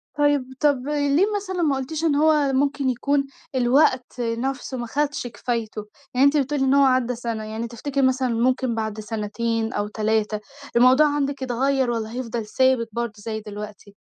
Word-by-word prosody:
طيب، 290 -3 +1
طب 285 -3 +2
ليه 290 +4 +2
مثلًا 375 -3 -3
ما 290 -4 +2
قُلتيش 295 +4 -4
إن 315 -3 +2
هو 300 -2 +3
ممكن 275 0 +1
يكون 275 +3 0 0.3
الوقت 255 0 +2
نَفسه 255 +3 -3
ما 240 -1 -4
خدش 290 0 -1
كفايته؟ 230 -3 -4 0.3
يعني 255 +2 +4
أنتِ 280 +2 +4
بتقولي 280 0 0
إن 265 - +3
هو 280 - +5
عدّى 255 -2 +2
سنة، 230 -2 -4
يعني 220 +2 -4
تفتكري 275 +4 -3
مثلًا 260 0 +1
ممكن 250 +1 +1
بعد 220 -1 -3
سنتين 225 +2 -2
أو 205 0 -1
3 215 0 0 0.4
الموضوع 255 +5 +6
عندِك 280 -1 -1
يتغيّر، 260 0 +1
والّا 225 -1 -3
هيفضل 235 -2 -4
ثابت 255 +1 +2
برضو 235 0 -3
زي 220 +1 -4
دلوقتي؟ 210 -1 -9
255 Hz, 165 wpm, -23 LUFS, 225-280 Hz, 0.4 s, الموضوع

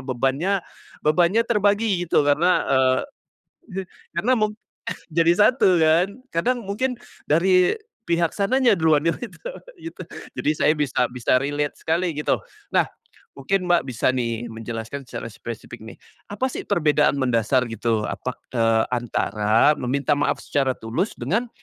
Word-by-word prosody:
bebannya 135 +9 0 0.4
bebannya 175 +8 +3
terbagi 205 -4 +1
gitu 150 - +3
karena, 155 +6 +3
eee, 130 -1 +3 0.7
je 195 -3 -4 0.3
karena 210 +10 +2
mu 215 0 0 0.6
jadi 165 +1 +4
1 205 -5 +4
kan, 160 +2 +4 0.3
kadang 240 +8 0
mungkin 250 +6 -2 0.3
dari 180 - +4 0.3
pihak 170 -2 0
sananya 240 +3 +3
duluan 160 -3 +3
yang 165 - +1
itu 240 - -8 0.3
gitu, 330 0 -8 0.3
jadi 150 - 0
saya 150 - +3
bisa 145 -4 +1
bisa 125 0 +1
relate 145 +1 -2
sekali 170 +2 0
gitu. 150 - +1 0.4
Nah - - +4 0.5
mungkin 185 +7 -1
Mbak 175 -1 +4
bisa 120 -1 0
nih 120 -2 -2
menjelaskan 115 +4 -6
secara - - -6
spesifik 115 +1 -8
nih, 110 - -10 0.4
apa 210 +5 -2
sih - - -5
perbedaan 150 -3 +3
mendasar 125 0 +2
gitu 115 -1 -1
apa, 125 - -4
k - - -41 0.2
eee, 115 0 +3
antara 115 0 +2
meminta 140 +4 0
maaf 145 - +1
secara 135 -2 0
tulus 130 - -2
dengan, 235 +4 -1
155 Hz, 140 wpm, -23 LUFS, 125-190 Hz, 0.7 s, jadi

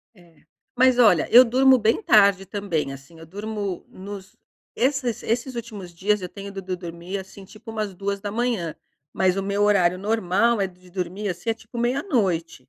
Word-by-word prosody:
É. 170 -4 -22 0.3
Mas, 255 0 +5
olha, 205 -10 +5
eu 245 +2 +10
durmo 260 +2 +5
bem 225 - +1
tarde 200 - +4
também, 175 -9 -3
assim, 140 +5 -14
eu 165 - -11
durmo 205 +1 -5
nos 195 0 -10 0.4
esses 255 -2 0
esses 240 +3 -2
últimos 210 -7 -7
dias, 200 +4 0
eu 180 - -5
tenho 200 +1 -9
do 195 - -6
do 185 0 -5
ido - - -3
dormir, 170 +3 -6
assim, 190 +1 -12
tipo 220 +3 -12
umas 215 -3 -3
2h. 200 -1 -2 0.4
Mas 185 0 +1
o 195 - -1
meu 200 +1 -1
horário 185 -4 +3
normal, 215 +2 +1
eh, 195 - +1
de 180 0 -18
dormir, 185 +3 -4
assim, 180 +6 -4
é - - 0
tipo 230 +1 -13
meia-noite. 235 - 0
200 Hz, 180 wpm, -23 LUFS, 180-225 Hz, 0.4 s, eu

